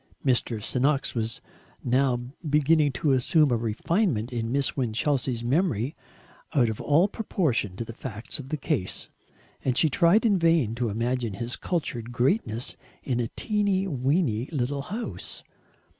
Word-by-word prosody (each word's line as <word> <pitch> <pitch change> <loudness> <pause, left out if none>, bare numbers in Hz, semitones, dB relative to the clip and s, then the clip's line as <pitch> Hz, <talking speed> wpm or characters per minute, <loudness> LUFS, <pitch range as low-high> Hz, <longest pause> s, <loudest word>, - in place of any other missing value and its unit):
Mr. 120 -3 +1
Se'noks 135 +6 +1
was 115 -1 -3 0.4
now 130 +1 +2 0.3
beginning 150 0 +4
to 140 +3 0
assume 140 +3 +3
a - - +4
refinement 120 - 0
in 115 -1 -2
Miss 140 +1 +1
Winchelsea's 125 0 0
memory 135 - +1 0.6
out 120 -5 +4
of 110 - -4
all 160 +6 +4
proportion 155 - -1
to 115 - -4
the 115 - -8
facts 115 0 -6
of 135 -1 -8
the 155 - -1
case, 135 - -1 0.5
and 130 -2 +1
she 160 - +4
tried 170 - +4
in 200 -4 +4
vain 165 -9 +3
to 120 0 -1
imagine 115 0 -1
his 120 +3 -2
cultured 120 -9 -3
greatness 120 - 0 0.3
in 125 -3 -1
a 120 - 0
"teeny 200 -3 +1
weeny" 135 - 0
little 140 -1 -1
house. 215 +11 -6
130 Hz, 145 wpm, -26 LUFS, 120-155 Hz, 0.6 s, beginning